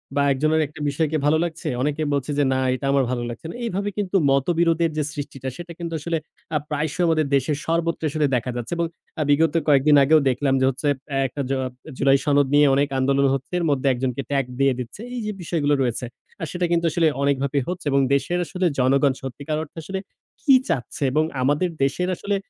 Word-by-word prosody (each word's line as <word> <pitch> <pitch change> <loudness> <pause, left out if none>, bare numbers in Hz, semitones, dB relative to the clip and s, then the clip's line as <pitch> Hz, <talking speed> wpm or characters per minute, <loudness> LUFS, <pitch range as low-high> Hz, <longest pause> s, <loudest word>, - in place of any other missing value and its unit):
বা 145 - +3
একজনের 155 +4 +2
একটা 150 - -14
বিষয়কে 155 +2 0
ভালো 150 +2 +4
লাগছে, 170 0 -4
অনেকে 150 +3 -1
বলছে 140 +1 -1
যে - - +4
না 130 - +1 0.2
এটা 135 - -5
আমার 140 -1 +3
ভালো 120 -1 -2
লাগছে 120 - -8
না। - - -7
এইভাবে 200 -2 -2
কিন্তু 200 -2 +1
মতবিরোধের 165 +3 +2
যে 155 - +1
সৃষ্টিটা 135 -2 -5
সেটা 175 0 -8
কিন্তু 170 -1 -4
আসলে 165 +2 -1 0.4
আ - - +5
প্রায়শই 155 +3 -1
আমাদের 155 -2 +2
দেশের 140 +2 +1
সর্বত্র 165 0 0
আসলে 150 +1 0
দেখা 125 +1 -1
যাচ্ছে 120 +5 -4
এবং 170 - +1 0.3
আ - - +1
বিগত 155 +3 +3
কয়েকদিন 145 0 +5
আগেও 155 +3 +5
দেখলাম 135 +2 +1
যে - - +4
হচ্ছে, 135 +3 -3 0.4
এক - - -3 0.2
জ - - -2 0.5
জুলাই 135 0 +4
সনদ 145 -2 +3
নিয়ে 145 0 +6
অনেক 140 +1 +2
আন্দোলন 140 +1 +2
হচ্ছে, 135 +4 -4
এর 170 - -1
মধ্যে 140 -1 +1
একজনকে 125 +1 -2
ট্যাগ 135 -2 +1
দিয়ে 135 -1 +4
দিচ্ছে। 125 - -7
এই 245 - -3
যে 210 - -2
বিষয়গুলো 155 -4 0
রয়েছে 125 -1 -1 0.4
আ - - -3
সেটা 180 0 -1
কিন্তু 170 0 +2
আসলে 165 +1 +2 0.2
অনেকভাবেই 140 0 +1
হচ্ছে 180 -1 -5
এবং 140 - +3 0.2
দেশের 175 +5 -1
আসলে 185 +1 -2
জনগণ 135 +2 +3
সত্যিকার 140 +4 -4
অর্থে 160 - -15
আসলে 190 +4 -4 0.4
কী 275 -3 +6
চাচ্ছে 140 - -2
এবং 155 +3 +2 0.2
আমাদের 145 +7 +1
দেশের 180 +7 0
আসলে 200 0 -2
145 Hz, 205 wpm, -23 LUFS, 135-165 Hz, 0.5 s, নিয়ে